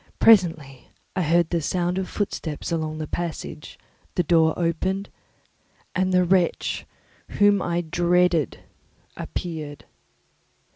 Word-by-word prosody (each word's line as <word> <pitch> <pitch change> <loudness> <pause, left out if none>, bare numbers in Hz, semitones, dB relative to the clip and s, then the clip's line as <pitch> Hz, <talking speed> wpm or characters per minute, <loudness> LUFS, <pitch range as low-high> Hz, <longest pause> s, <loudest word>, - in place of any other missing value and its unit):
Presently 165 - +3 0.3
I 185 - +1
heard 170 0 +2
the 170 -1 +1
sound 180 +3 -1
of 190 - -4
footsteps 170 -6 -3
along 155 -2 -2
the 155 - -3
passage; 165 -2 -5 0.4
the 180 - +2
door 160 -2 +3
opened, 185 +4 -1 0.8
and 185 0 +1
the 180 0 +4
wretch 180 -1 +1 0.5
whom 205 -1 +5
I 170 0 0
dreaded 175 -1 +1 0.5
appeared. 155 -4 -6
175 Hz, 110 wpm, -24 LUFS, 160-185 Hz, 0.8 s, whom